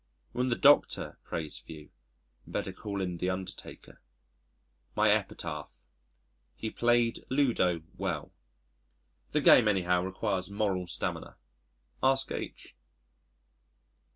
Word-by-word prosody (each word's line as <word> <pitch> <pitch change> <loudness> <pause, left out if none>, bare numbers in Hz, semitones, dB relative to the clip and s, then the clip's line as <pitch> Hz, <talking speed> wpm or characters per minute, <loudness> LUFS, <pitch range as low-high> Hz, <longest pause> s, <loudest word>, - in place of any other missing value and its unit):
When 125 +1 0
the 120 - +2
Doctor 145 +3 +4
prays 80 -2 -5
for 80 - -11
you 75 -1 -13 0.6
better - - -3
call 100 -2 -4
in 90 -2 -2
the 90 +2 -1
undertaker. 95 0 -7 0.9
My - - +4
epitaph - - -3 0.7
"He 110 - -4
played 120 -1 +2
Ludo 115 - +2 0.2
well." - - -3 1.0
The 150 - +2
game 125 -4 +7
anyhow 90 -3 +2
requires 95 0 -2
moral 100 -3 -1
stamina 85 - -3 0.6
ask 135 0 +3
H - - -6
100 Hz, 105 wpm, -30 LUFS, 90-120 Hz, 1.0 s, game